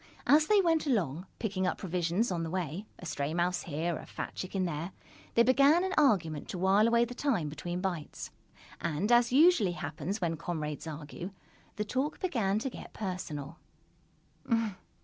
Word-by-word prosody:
As 305 Hz, +2 st, +5 dB
they 420 Hz, -2 st, +5 dB
went 325 Hz, -4 st, +2 dB
along, 185 Hz, -, 0 dB
picking 190 Hz, -4 st, -1 dB
up -, -, -1 dB
provisions 180 Hz, +4 st, 0 dB
on 175 Hz, -2 st, -1 dB
the 165 Hz, -, -3 dB
way 180 Hz, +3 st, -3 dB
a -, -, -10 dB
stray 150 Hz, -1 st, -2 dB
mouse 175 Hz, +1 st, +1 dB
here, 165 Hz, +1 st, -2 dB
a -, -, -10 dB
fat -, -, -5 dB
chicken 185 Hz, 0 st, -2 dB
there 170 Hz, +2 st, -3 dB, 0.4 s
they 235 Hz, -, +7 dB
began 280 Hz, +7 st, +5 dB
an 380 Hz, 0 st, -1 dB
argument 175 Hz, -, +2 dB
to -, -, -4 dB
while 195 Hz, +4 st, +4 dB
away 235 Hz, 0 st, +4 dB
the 245 Hz, -, -7 dB
time 240 Hz, -, 0 dB
between 175 Hz, +4 st, -4 dB
bites. 175 Hz, -6 st, -4 dB, 0.5 s
And, 170 Hz, +7 st, -1 dB
as 240 Hz, 0 st, +5 dB
usually 275 Hz, -, +5 dB
happens 175 Hz, +6 st, -4 dB
when 165 Hz, -3 st, -1 dB
comrades 155 Hz, -2 st, -4 dB
argue, 155 Hz, +3 st, -6 dB, 0.5 s
the 210 Hz, -, -2 dB
talk 265 Hz, +8 st, -1 dB
began 220 Hz, -, +1 dB
to 235 Hz, +5 st, -1 dB
get -, -, -10 dB
personal. 170 Hz, -6 st, -5 dB
185 Hz, 170 wpm, -31 LUFS, 165-235 Hz, 0.5 s, they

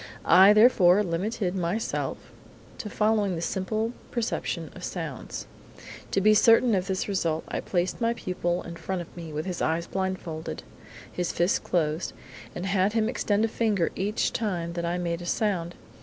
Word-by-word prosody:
I, 190 Hz, +2 st, +8 dB
therefore, 210 Hz, -3 st, +6 dB
limited 185 Hz, +2 st, -2 dB
myself 185 Hz, +5 st, -2 dB, 0.6 s
to 210 Hz, -, -5 dB
following 210 Hz, -3 st, +1 dB
the 165 Hz, -, -4 dB
simple 215 Hz, +6 st, -1 dB, 0.2 s
perception 235 Hz, -2 st, -2 dB
of -, -, -10 dB
sounds. -, -, -5 dB, 0.6 s
To -, -, +1 dB
be 215 Hz, +2 st, +5 dB
certain 230 Hz, +2 st, +5 dB
of 185 Hz, -1 st, 0 dB
this 190 Hz, -1 st, -1 dB
result, 165 Hz, -5 st, 0 dB
I -, -, -2 dB
placed 180 Hz, +4 st, -1 dB
my 230 Hz, 0 st, +1 dB
pupil 175 Hz, -3 st, -2 dB
in 170 Hz, 0 st, -8 dB
front 185 Hz, -1 st, -3 dB
of -, -, -18 dB
me 165 Hz, -2 st, -7 dB
with 155 Hz, +1 st, -3 dB
his 180 Hz, -2 st, -4 dB
eyes 165 Hz, +1 st, 0 dB
blinded, 180 Hz, -4 st, -4 dB, 0.5 s
his 180 Hz, -1 st, -2 dB
fists 175 Hz, +3 st, +1 dB
closed, 155 Hz, -1 st, -1 dB, 0.4 s
and 180 Hz, -, -4 dB
had 195 Hz, +1 st, +2 dB
him 220 Hz, -1 st, +2 dB
extend 215 Hz, -3 st, +1 dB
a -, -, +1 dB
finger 215 Hz, -6 st, 0 dB
every 200 Hz, +2 st, -1 dB
time 180 Hz, -8 st, -1 dB
that 170 Hz, 0 st, -3 dB
I 170 Hz, +1 st, -1 dB
made 170 Hz, -1 st, -2 dB
a 175 Hz, -, -7 dB
sound. 175 Hz, -4 st, -1 dB
185 Hz, 170 wpm, -27 LUFS, 170-210 Hz, 0.6 s, I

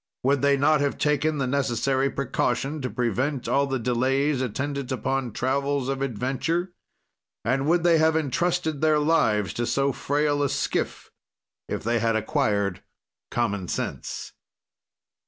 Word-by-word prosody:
"Would 140 Hz, +1 st, +2 dB
they 140 Hz, 0 st, +4 dB
not 150 Hz, +1 st, +3 dB
have 145 Hz, -1 st, 0 dB
taken 150 Hz, +1 st, +1 dB
the 135 Hz, -, 0 dB
necessary 135 Hz, 0 st, +1 dB
precaution 135 Hz, +2 st, -1 dB
to 130 Hz, -, -2 dB
prevent 125 Hz, +4 st, -1 dB
all 140 Hz, 0 st, +2 dB
the 135 Hz, -1 st, -1 dB
delays 130 Hz, +4 st, +1 dB
attendant 140 Hz, +2 st, -3 dB
upon 130 Hz, 0 st, -1 dB
travels 140 Hz, +3 st, -1 dB
of 135 Hz, 0 st, -2 dB
adventure, 135 Hz, -, -1 dB, 0.7 s
and 135 Hz, +2 st, +1 dB
would 170 Hz, +1 st, +3 dB
they 170 Hz, -2 st, +5 dB
have 160 Hz, 0 st, +3 dB
entrusted 160 Hz, +1 st, 0 dB
their 155 Hz, -1 st, +4 dB
lives 145 Hz, -, +2 dB
to 120 Hz, 0 st, -2 dB
so 135 Hz, +3 st, +1 dB
frail 145 Hz, +2 st, 0 dB
a 140 Hz, -, +1 dB
skiff, -, -, -2 dB, 0.6 s
if -, -, -3 dB
they 115 Hz, +2 st, +1 dB
had 115 Hz, 0 st, +1 dB
acquired 105 Hz, -, 0 dB, 0.5 s
common 100 Hz, -6 st, -1 dB
sense?" -, -, -4 dB
135 Hz, 140 wpm, -25 LUFS, 125-145 Hz, 0.7 s, they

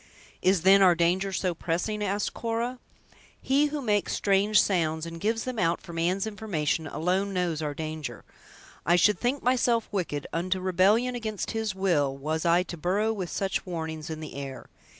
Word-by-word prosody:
"Is, 185 Hz, -2 st, +3 dB
then, 195 Hz, +1 st, +7 dB
our 180 Hz, -2 st, +6 dB
danger 180 Hz, +3 st, +1 dB
so 185 Hz, -1 st, -1 dB
pressing?" 180 Hz, +6 st, -2 dB
asked 205 Hz, +1 st, -1 dB
Cora. 235 Hz, +2 st, -2 dB, 0.6 s
"He 280 Hz, +3 st, +2 dB
who 295 Hz, -1 st, -4 dB
makes 210 Hz, -3 st, +1 dB
strange 200 Hz, +1 st, +3 dB
sounds, 160 Hz, -4 st, +1 dB
and 165 Hz, 0 st, -7 dB
gives 225 Hz, +2 st, 0 dB
them 255 Hz, -3 st, -4 dB
out 170 Hz, -2 st, +1 dB
for 170 Hz, -, -11 dB
man's 180 Hz, +4 st, 0 dB
information, 185 Hz, -8 st, -2 dB
alone 185 Hz, +6 st, -1 dB
knows 175 Hz, -4 st, 0 dB
our 150 Hz, -2 st, -3 dB
danger. 155 Hz, -6 st, -5 dB, 0.6 s
I 175 Hz, -, +4 dB
should 205 Hz, +4 st, +4 dB
think 255 Hz, +3 st, -1 dB
myself 240 Hz, -2 st, +2 dB
wicked, 165 Hz, -7 st, -2 dB
unto 185 Hz, +3 st, -1 dB
rebellion 195 Hz, +7 st, +3 dB
against 220 Hz, -4 st, -4 dB
His 220 Hz, -3 st, -2 dB
will, 150 Hz, -8 st, +1 dB
was 155 Hz, +4 st, -2 dB
I 170 Hz, +2 st, +4 dB
to 175 Hz, -1 st, -8 dB
burrow 200 Hz, +7 st, +1 dB
with 185 Hz, -5 st, -4 dB
such 195 Hz, -1 st, -2 dB
warnings 160 Hz, -3 st, -5 dB
in 160 Hz, -1 st, -5 dB
the 155 Hz, -, -7 dB
air! 135 Hz, -1 st, -7 dB
185 Hz, 175 wpm, -27 LUFS, 165-210 Hz, 0.6 s, then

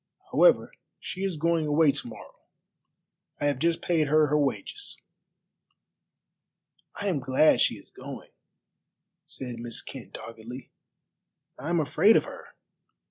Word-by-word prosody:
However, -, -, +5 dB, 0.3 s
she 185 Hz, -, -6 dB
is 190 Hz, -4 st, -1 dB
going 165 Hz, 0 st, +1 dB
away 150 Hz, 0 st, +4 dB
to 135 Hz, -3 st, -5 dB
morrow. 115 Hz, -, -11 dB, 1.1 s
I 145 Hz, -, -1 dB
have 145 Hz, -3 st, +1 dB
just 165 Hz, +2 st, +1 dB
paid 160 Hz, -4 st, +2 dB
her 155 Hz, +1 st, +4 dB
her 150 Hz, -, +2 dB
wages." 150 Hz, -, -3 dB, 2.0 s
"I 205 Hz, -, -4 dB
am 175 Hz, -7 st, +1 dB
glad 135 Hz, +4 st, +4 dB
she -, -, +3 dB
is -, -, -18 dB
going," -, -, -10 dB, 1.0 s
said 125 Hz, -3 st, -6 dB
Miss 120 Hz, -1 st, -5 dB
Kent -, -, -10 dB
doggedly; 115 Hz, +3 st, -9 dB, 0.9 s
"I 145 Hz, +5 st, -5 dB
am 170 Hz, -1 st, +2 dB
afraid 160 Hz, +8 st, +5 dB
of -, -, +2 dB
her. -, -, -11 dB
150 Hz, 135 wpm, -27 LUFS, 130-170 Hz, 2.0 s, However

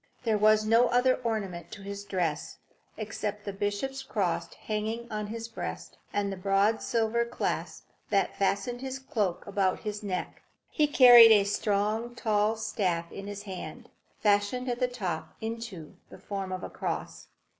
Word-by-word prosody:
There 220 Hz, -3 st, +1 dB
was 215 Hz, 0 st, +5 dB
no 230 Hz, +3 st, +5 dB
other 250 Hz, +2 st, +3 dB
ornament 200 Hz, -7 st, -3 dB
to 200 Hz, -, -9 dB
his 200 Hz, 0 st, -6 dB
dress 170 Hz, -6 st, -2 dB, 0.4 s
except 210 Hz, -1 st, -4 dB
the 200 Hz, -, -4 dB
bishop's 205 Hz, +7 st, -2 dB
cross 185 Hz, -10 st, -1 dB
hanging 220 Hz, +2 st, -3 dB
on 210 Hz, -1 st, -3 dB
his 225 Hz, +1 st, -5 dB
breast, 230 Hz, -, -7 dB
and 200 Hz, -1 st, -1 dB
the -, -, -7 dB
broad 195 Hz, +3 st, +2 dB
silver 230 Hz, 0 st, +1 dB
clasp 235 Hz, -, -3 dB, 0.2 s
that 200 Hz, -2 st, +1 dB
fastened 200 Hz, +5 st, 0 dB
his 265 Hz, 0 st, -4 dB
cloak 210 Hz, -9 st, -2 dB
about 195 Hz, -2 st, 0 dB
his 210 Hz, -1 st, -4 dB
neck. 190 Hz, -3 st, -4 dB, 0.3 s
He 300 Hz, -2 st, +3 dB
carried 245 Hz, -5 st, +9 dB
a 210 Hz, -2 st, +7 dB
strong, 210 Hz, +3 st, 0 dB
tall 215 Hz, -1 st, +1 dB
staff 185 Hz, -6 st, -1 dB
in 195 Hz, 0 st, -7 dB
his 205 Hz, 0 st, -6 dB
hand, 190 Hz, -3 st, -8 dB, 0.3 s
fashioned 205 Hz, +5 st, +2 dB
at 240 Hz, 0 st, -2 dB
the 250 Hz, -, +2 dB
top 190 Hz, -10 st, -4 dB
into 220 Hz, -8 st, -6 dB
the -, -, -11 dB
form 195 Hz, -2 st, -5 dB
of 185 Hz, 0 st, -4 dB
a -, -, -5 dB
cross. -, -, -4 dB
210 Hz, 160 wpm, -29 LUFS, 195-230 Hz, 0.4 s, carried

